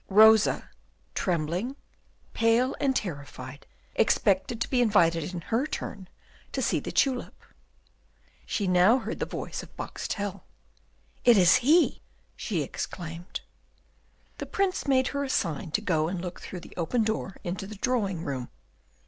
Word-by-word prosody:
Rosa, 220 +1 +6 0.5
trembling, 180 - -1 0.6
pale 230 +3 +3
and 270 -2 +1
terrified, 145 - -5 0.3
expected 210 +1 +2
to - - +1
be 250 -2 +2
invited 170 -7 +3
in 175 -2 -5
her 235 - 0
turn 190 -10 -6 0.4
to - - -1
see - - +2
the - - -6
tulip. 265 -3 +1 1.1
She 205 - -1
now 180 +6 +5
heard - - -5
the - - -1
voice - - -5
of - - -15
Boxtel. 205 -2 -4 0.8
"It 240 -3 +7
is 180 +2 +7
he!" 300 +8 +3 0.3
she - - -2
exclaimed. 170 0 -6 1.0
The - - -4
Prince 385 -5 0
made 260 -2 +3
her 280 0 -2
a 275 - -4
sign 165 - -1
to 215 - +2
go 160 -6 +1
and 180 +1 -3
look 175 0 -6
through 180 - -7
the - - -13
open 180 +8 +1
door 215 -3 -2
into 185 +2 -4
the 215 - -8
drawing 200 -6 -1
room. 130 -3 -4
200 Hz, 145 wpm, -28 LUFS, 175-245 Hz, 1.1 s, It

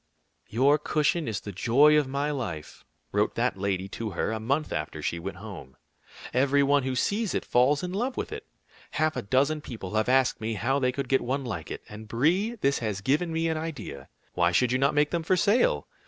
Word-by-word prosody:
"Your 140 +6 +3
cushion 155 +2 0
is 110 -3 -2
the 100 - -7
joy 135 +10 +4
of 150 -3 +3
my 140 +2 -1
life," 105 - -5 0.3
wrote - - +1
that - - +1
lady 95 -1 -2
to 110 +2 -4
her - - 0
a 110 - -2
month 140 +8 -1
after 75 - -4
she 85 - -2
went 95 +2 -6
home. 95 -11 -10 0.6
"Every 140 +2 +3
one 140 +1 +3
who 130 0 -2
sees 205 - 0
it, - - -2
falls 135 +5 +3
in 180 0 -3
love 245 +6 -2
with - - -3
it. - - -7 0.5
Half 155 0 +1
a 125 - -2
dozen 140 +8 +1
people 110 -8 -7
have 110 +2 +1
asked 130 -2 +3
me 110 0 -2
how 130 +7 0
they 130 -2 +1
could 135 +1 -4
get 135 +1 +2
one 135 +2 -2
like 90 -9 -5
it. - - -6
And, 105 +1 -10
Brie, 170 - +1
this 140 0 +2
has 105 -4 -3
given 150 +8 +1
me 165 0 0
an 160 -1 0
idea. 155 - -6 0.2
Why 85 0 +2
should 125 +7 +2
you 125 - +1
not 140 +2 +2
make 145 0 +3
them 170 - 0
for 180 +3 +1
sale? 220 - +2
135 Hz, 220 wpm, -27 LUFS, 110-150 Hz, 0.6 s, joy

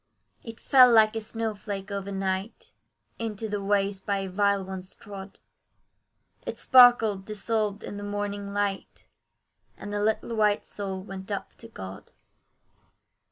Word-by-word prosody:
It 230 -1 -9
fell 255 -3 +7
like 220 -1 +5
a 225 - -2
snow 225 0 -3
flake 200 -1 -6
over 200 0 -4
night, 195 +2 -3 0.5
Into 225 -1 -3
the 205 -1 -3
ways 200 -1 +1
by 195 -1 -1
vile 200 +1 +1
ones 185 -1 -8
trod; 195 -1 -10 1.1
It - - -5
sparkled 240 -6 +6
dissolved 210 0 -2
in 205 - -6
the 205 - -6
morning 205 0 -4
light, 200 -1 -3 0.7
And 205 - -7
the 205 - -1
little 220 +2 0
white 210 -1 +2
soul 190 -2 -5
went 195 0 -8
up 200 - -4
to 230 - -12
God. 95 - -9
205 Hz, 140 wpm, -27 LUFS, 195-215 Hz, 1.1 s, fell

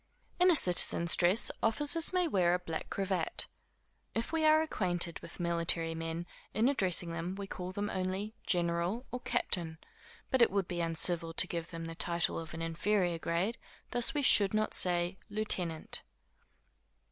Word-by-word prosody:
In 360 +1 +5
a 350 - +5
citizen's 175 - +6
dress, 185 +5 +3
officers 295 +8 +3
may 365 -2 +1
wear 180 - +2
a - - +1
black 165 -3 -6
cravat. 190 -4 -2 0.7
If 230 +7 -3
we 320 -1 0
are 310 0 +5
acquainted 175 - -1
with - - -12
military 170 -1 0
men, 165 +1 -4 0.3
in 220 +4 +3
addressing 185 -10 +1
them, 170 +3 -4
we 200 0 -6
call 185 -1 -6
them 205 +2 -3
only 190 +3 -3
general, 175 +6 -1
or 250 - -4
captain; 175 -10 -1 0.5
but 260 - +2
it 235 - +6
would 195 -1 -1
be 175 -1 -3
uncivil 165 0 +1
to - - +4
give 170 -2 -5
them 165 -1 -7
the 165 - -6
title 170 +1 0
of 160 -1 -8
an 165 - -5
inferior 175 +1 0
grade 175 +8 -1 0.3
thus 245 +5 +1
we 290 - 0
should 205 -5 +4
not 215 0 0
say 175 +1 0
lieutenant. 185 -6 -1
180 Hz, 165 wpm, -32 LUFS, 170-215 Hz, 0.7 s, citizen's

